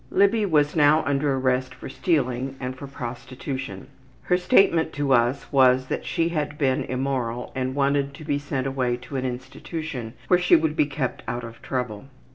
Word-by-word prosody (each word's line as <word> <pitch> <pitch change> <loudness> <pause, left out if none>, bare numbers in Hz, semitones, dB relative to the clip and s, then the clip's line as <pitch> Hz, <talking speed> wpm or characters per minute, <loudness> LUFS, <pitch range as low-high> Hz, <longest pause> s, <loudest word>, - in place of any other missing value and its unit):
Libby 200 +2 +3
was 150 -4 +2
now 155 0 +5
under 140 0 +1
arrest 130 -1 0
for - - -9
stealing 135 -4 -1
and 130 0 -4
for 140 +2 -8
prostitution. 130 -3 -6 0.4
Her 180 - +2
statement 180 -4 +3
to 145 -2 +1
us 120 +3 +1
was 130 -1 +5
that - - -3
she 165 0 +1
had 150 -3 -2
been 135 -3 +1
immoral 125 -2 -2
and 130 0 -2
wanted 140 0 +1
to 155 - -10
be 145 -2 0
sent 140 -2 -3
away 130 -2 0
to 125 +3 -10
an 130 - -2
institution 125 0 -5
where 180 - +5
she 180 - +5
would 160 -2 +1
be 150 - +3
kept 135 -3 -3
out 120 0 -3
of 115 0 -10
trouble. 125 -4 -3
135 Hz, 180 wpm, -24 LUFS, 125-150 Hz, 0.4 s, now